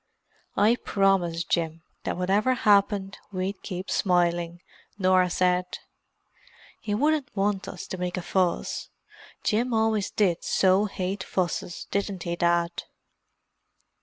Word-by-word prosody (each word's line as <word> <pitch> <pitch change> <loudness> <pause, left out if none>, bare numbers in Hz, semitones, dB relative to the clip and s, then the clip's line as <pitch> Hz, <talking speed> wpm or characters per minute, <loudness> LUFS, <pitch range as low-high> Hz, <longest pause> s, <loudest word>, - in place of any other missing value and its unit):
"I 215 +4 +4
promised 185 -6 +1
Jim 165 -1 0 0.2
that - - -2
whatever 200 +8 +2
happened 200 -3 +2
we'd 190 +1 -3
keep 185 0 -5
smiling," 175 -2 +1 0.4
Norah 185 -2 +3
said. 180 0 +1 1.0
"He 205 -2 -2
wouldn't 295 +3 +1
want 195 -1 0
us 185 - -7
to 185 - -6
make 180 0 -2
a 180 - -3
fuss. 180 -2 -1 0.5
Jim 235 +3 +1
always 220 -2 +1
did 185 -5 +1
so 190 +2 +3
hate 190 -1 -3
fusses, 175 -1 -2
didn't 200 -2 -2
he, 170 0 -2
Dad?" 170 0 +2
190 Hz, 120 wpm, -26 LUFS, 175-205 Hz, 1.0 s, I